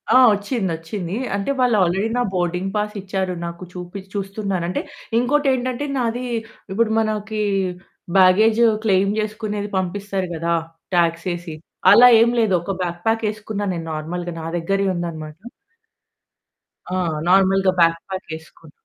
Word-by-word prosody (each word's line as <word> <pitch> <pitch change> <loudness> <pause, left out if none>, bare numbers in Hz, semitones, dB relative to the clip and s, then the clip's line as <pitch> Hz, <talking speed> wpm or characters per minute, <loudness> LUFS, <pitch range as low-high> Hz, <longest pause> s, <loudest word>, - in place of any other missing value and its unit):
ఆ! - - +9 0.2
వచ్చిందొచ్చింది. 190 -4 -3 0.2
అంటే 200 +7 -1
వాళ్ళు 245 -3 +3
ఆల్రెడీ 190 +5 0
నా 245 - +2
బోర్డింగ్ 180 +1 -1
పాస్ 210 0 -1
ఇచ్చారు. 190 -1 -2
నాకు 170 +1 -7
చూపి 180 +2 -7
చూస్తున్నానంటే 195 -3 -2 0.4
ఇంకోటేంటంటే 260 0 +1
నాది 245 0 -1 0.5
ఇప్పుడు 225 +3 +1
మనకి 215 0 -2 0.8
బ్యాగేజ్ 215 +5 +5 0.2
క్లెయిం 195 -1 +3
జేసుకునేది 210 -1 -3
పంపిస్తారు 190 0 -2
గదా! 170 +1 0 0.4
టాక్సేసి, 170 0 0 0.4
అలా 240 +4 +9
ఏమి 235 +1 +4
లేదు, 220 -4 +2
ఒక 185 +3 -4
బ్యాక్ 175 -1 -3
ప్యాకేసుకున్న 215 -2 -1
నేను 165 -1 -5
నార్మల్‌గా 175 +3 -4
నా - - -6
దగ్గరే 195 +4 0
ఉందనమాట. 160 -3 -5 1.6
ఆ! - - +1 0.3
నార్మల్‌గా 195 0 +4
బ్యాక్ 165 0 +4
ప్యాక్ 190 -2 -6
ఏసుకున్నా. 160 0 -17
195 Hz, 120 wpm, -21 LUFS, 175-215 Hz, 1.6 s, ఆ